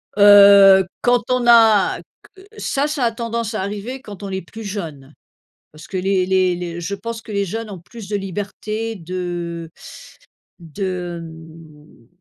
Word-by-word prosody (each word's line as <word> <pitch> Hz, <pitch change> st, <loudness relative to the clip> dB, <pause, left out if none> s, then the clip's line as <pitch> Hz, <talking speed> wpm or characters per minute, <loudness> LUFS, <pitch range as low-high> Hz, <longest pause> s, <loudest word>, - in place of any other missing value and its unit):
Heu, 200 Hz, -1 st, +8 dB, 0.2 s
quand 245 Hz, 0 st, +2 dB
on 250 Hz, -1 st, +1 dB
a 225 Hz, -4 st, +5 dB, 0.4 s
q 380 Hz, -, -16 dB
ça, 280 Hz, +2 st, -1 dB
ça 300 Hz, -3 st, -2 dB
a 230 Hz, -, +1 dB
tendance 230 Hz, -1 st, -4 dB
à 215 Hz, -, -2 dB
arriver 210 Hz, +7 st, -5 dB
quand 205 Hz, -5 st, -11 dB
on 200 Hz, -, -5 dB
est 190 Hz, 0 st, -4 dB
plus 225 Hz, +6 st, -11 dB
jeune. 160 Hz, -9 st, -7 dB, 0.6 s
Parce 155 Hz, +1 st, -13 dB
que 190 Hz, -, -6 dB
les 185 Hz, 0 st, +1 dB
les 185 Hz, -1 st, +2 dB
les 175 Hz, -1 st, -6 dB
je 195 Hz, +4 st, -4 dB
pense 230 Hz, +2 st, -6 dB
que 220 Hz, -, -10 dB
les 200 Hz, -1 st, 0 dB
jeunes 225 Hz, +3 st, -5 dB
ont 190 Hz, -4 st, -8 dB
plus 215 Hz, +3 st, -12 dB
de 205 Hz, -, -1 dB
liberté 205 Hz, +3 st, -5 dB
de 175 Hz, -2 st, -5 dB, 0.9 s
de, 175 Hz, +1 st, -5 dB
hem 160 Hz, -5 st, -14 dB
195 Hz, 160 wpm, -19 LUFS, 175-225 Hz, 0.9 s, Heu